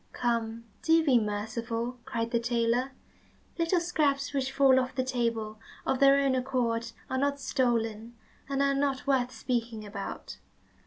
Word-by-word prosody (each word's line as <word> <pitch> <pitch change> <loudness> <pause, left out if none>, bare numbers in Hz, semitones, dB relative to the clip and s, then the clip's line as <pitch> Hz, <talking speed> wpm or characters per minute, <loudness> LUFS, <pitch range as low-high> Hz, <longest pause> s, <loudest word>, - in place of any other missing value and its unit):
"Come, 230 -1 -1 0.2
do 325 -1 +4
be 260 -5 +5
merciful," 230 +3 -3
cried 230 -3 -2
the 235 - +2
tailor. 235 +2 0 0.7
"Little 335 +2 +2
scraps 290 -5 0
which 265 -1 -1
fall 270 -1 +5
off 260 +1 -3
the 260 - +1
table 230 -4 -2 0.3
of 265 - 0
their 275 0 +6
own 275 -1 +2
accord 245 -3 -1 0.2
are 260 - -1
not 280 +1 0
stolen, 235 -4 -1 0.3
and 275 0 +1
are 275 0 +3
not 275 -1 0
worth 260 -3 +2
speaking 230 -4 -3
about. 200 -1 -7
250 Hz, 150 wpm, -29 LUFS, 230-275 Hz, 0.7 s, their